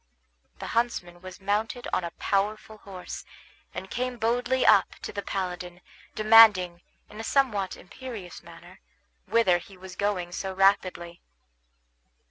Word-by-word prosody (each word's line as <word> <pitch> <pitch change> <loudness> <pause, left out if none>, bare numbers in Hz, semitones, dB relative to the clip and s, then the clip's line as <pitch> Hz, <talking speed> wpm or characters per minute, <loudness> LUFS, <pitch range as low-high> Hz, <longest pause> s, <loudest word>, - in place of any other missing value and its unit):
The - - -7
huntsman 180 -7 -1
was 185 +1 -10
mounted 210 +5 -2
on 185 - +1
a 170 - -3
powerful 215 +2 -1
horse, 185 -3 -8 0.5
and 185 +3 -7
came 250 0 -2
boldly 245 +3 +1
up - - +5
to - - -6
the 200 - -3
paladin, 180 -3 -4 0.4
demanding, 215 -5 +6 0.3
in 210 - -12
a - - -4
somewhat 225 -8 0
imperious 205 -3 -9
manner, 170 +2 -15 0.5
whither 190 -7 +3
he 190 +2 -15
was 185 0 -11
going 185 -4 -1
so 190 +1 -4
rapidly. 185 -3 +1
195 Hz, 130 wpm, -27 LUFS, 180-225 Hz, 0.5 s, demanding